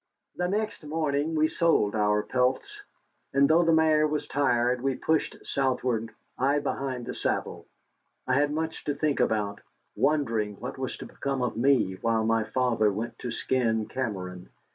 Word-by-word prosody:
The 180 - -1
next 210 -1 -2
morning 150 0 -1
we 155 0 +3
sold 160 -12 +2
our 105 -1 +2
pelts. 125 +1 -1 0.5
And 140 0 +5
though 160 +3 +5
the 165 -1 +3
mare 155 -1 +4
was 150 0 -2
tired, 125 -3 +1
we 135 0 0
pushed 160 +3 0
southward, 125 -4 0 0.3
I 140 +3 +3
behind 135 -3 -3
the - - -5
saddle. - - -2 0.6
I 130 - 0
had 145 +2 +3
much 160 +1 -3
to 145 - -1
think 150 -1 0
about, 105 -2 0 0.3
wondering 115 -8 +1
what - - -7
was - - -3
to - - -8
become 135 -2 -3
of 125 - -1
me 120 -6 +2
while 115 -1 +1
my 115 -1 +2
father 115 -4 +1
went 110 +4 -5
to 125 - -4
skin 115 -2 0
Cameron. 95 -9 -5
130 Hz, 165 wpm, -27 LUFS, 115-150 Hz, 0.6 s, And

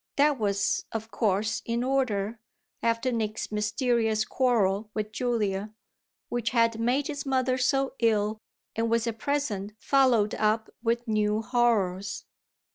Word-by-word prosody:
That 285 -1 +3
was 200 -2 0
of 220 0 -5
course 210 -1 0
in 235 +1 -1
order, 235 -5 0 0.4
after 230 +2 +1
Nick's 215 -3 -2
mysterious 220 +1 +1
quarrel 215 -6 +1
with 215 -1 -2
Julia, 215 -4 -1 0.5
which 240 -1 -1
had 230 -2 +2
made 250 +5 +1
his 290 -1 -4
mother 260 -1 +1
so 270 +1 +1
ill 215 -2 +1 0.4
and 225 +1 0
was 230 0 +2
at 230 -1 -3
present 220 -9 -2
followed 245 -5 +3
up 215 +1 0
with 235 +1 0
new 215 0 +1
horrors. 210 -6 0
225 Hz, 130 wpm, -27 LUFS, 210-245 Hz, 0.5 s, That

